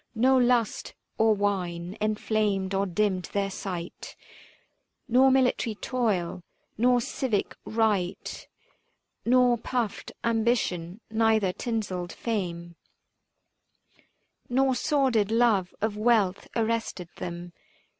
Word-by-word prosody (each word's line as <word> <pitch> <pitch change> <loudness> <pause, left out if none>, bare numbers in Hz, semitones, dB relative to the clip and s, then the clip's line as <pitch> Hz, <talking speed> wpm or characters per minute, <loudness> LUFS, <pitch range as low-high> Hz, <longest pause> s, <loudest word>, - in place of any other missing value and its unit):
No 255 +4 +4
lust 245 -3 +1 0.2
or 220 -1 +4
wine 185 -3 -2
enflamed 210 -2 0
or 195 +1 +1
dimmed 185 0 0
their 200 -1 0
sight; 180 -3 -6 0.9
325 255 - -21
Nor 260 +2 +7
military 255 -4 +2
toil, 205 -8 -1 0.3
nor 245 +2 +3
civic 235 -3 -2
rite, 210 -5 -1 0.8
Nor 245 -1 +4
puffed 235 -3 -3
ambition, 220 -5 0
neither 220 -4 +2
tinselled 190 -7 -3
fame 175 -6 -4 1.7
Nor 265 +1 +3
sordid 255 -6 +1
love 220 -5 +3
of 215 0 0
wealth 215 -4 +2
arrested 225 -6 -1
them. 175 0 -6
215 Hz, 95 wpm, -27 LUFS, 185-240 Hz, 1.7 s, Nor